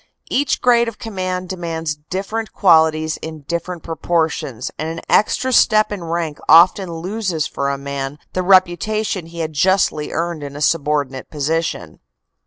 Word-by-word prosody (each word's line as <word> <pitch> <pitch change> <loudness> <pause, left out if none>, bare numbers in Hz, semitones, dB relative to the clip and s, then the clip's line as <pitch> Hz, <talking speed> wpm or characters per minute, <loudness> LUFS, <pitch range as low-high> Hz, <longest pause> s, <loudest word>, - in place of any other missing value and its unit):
Each 280 +1 +1
grade 235 -1 +4
of 230 -2 -5
command 185 -4 -4
demands 165 -4 -3
different 195 +9 -5
qualities 160 -4 +3
in 160 -1 -8
differ 170 +4 -3
ent 170 - -11
proportions, 160 -6 -2
and 155 - -2
an 165 0 -5
extra 255 +4 +2
step 215 -2 +4
in 200 -4 -4
rank 165 -2 -3
often 175 +3 +6
loses 180 -1 -2
for 140 0 -2
a 140 - -1
man 140 0 -5 0.2
the 185 - 0
reputation 185 +1 +2
he 170 0 -6
had 160 -1 -3
justly 180 -2 +1
earned 170 -1 -2
in 140 -1 -7
a - - -6
subordinate 145 -3 0
position." 160 +2 -2
165 Hz, 155 wpm, -19 LUFS, 155-190 Hz, 0.2 s, often